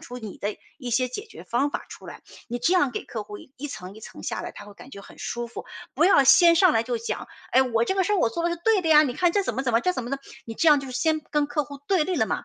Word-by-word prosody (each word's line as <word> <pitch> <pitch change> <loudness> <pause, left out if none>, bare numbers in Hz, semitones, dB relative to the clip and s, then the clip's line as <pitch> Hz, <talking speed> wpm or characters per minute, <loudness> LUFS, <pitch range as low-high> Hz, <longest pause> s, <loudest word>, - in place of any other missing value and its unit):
出 245 - -9
你 215 -4 -9
的 205 +1 -3 0.2
一 255 -4 -6
些 250 +2 +1
解 410 - -7
决 - - -12
方 275 +5 0
法 - - -4
儿 - - -16
出 - - -12
来。 - - -10 0.2
你 240 0 -5
这 345 +9 +2
样 285 -8 +3
给 - - -4
客 215 -3 -6
户 205 0 -9
一 270 +2 -9
层 185 -9 -8
一 - - -12
层 - - -11
下 - - -3
来， - - -6
他 205 - -11
会 205 - -13
感 250 - -14
觉 200 - -9
很 - - -15
舒 240 0 -4
服。 - - -8 0.3
不 325 - +3
要 360 -7 +6
先 335 +5 +7
上 360 -1 +5
来 225 +1 +1
就 240 0 -2
讲： 230 +1 -4 0.2
“哎， 260 - +5
我 235 -3 +1
这 380 - -1
个 380 - +2
事 420 - 0
儿 - - +3
我 230 - +2
做 335 +7 -3
得 345 - +1
是 345 - -2
对 440 -4 +3
的 325 - -1
呀， 305 -1 +7
你 265 -5 -1
看 350 +4 +1
这 405 - +2
怎 250 - -2
么 265 - -2
怎 240 - 0
么 230 - +4
这 365 - +1
怎 255 - -4
么 245 - -6
弄 275 - -2 0.3
“你 225 - -6
这 325 - +3
样 295 - +7
就 275 - -6
是 255 - -7
先 315 -1 +1
跟 295 -1 +1
客 300 0 -1
户 285 0 -10
对 365 -6 +3
立 370 - -2
了 - - +3
嘛。 - - -3
275 Hz, 360 characters per minute, -25 LUFS, 235-335 Hz, 0.3 s, 先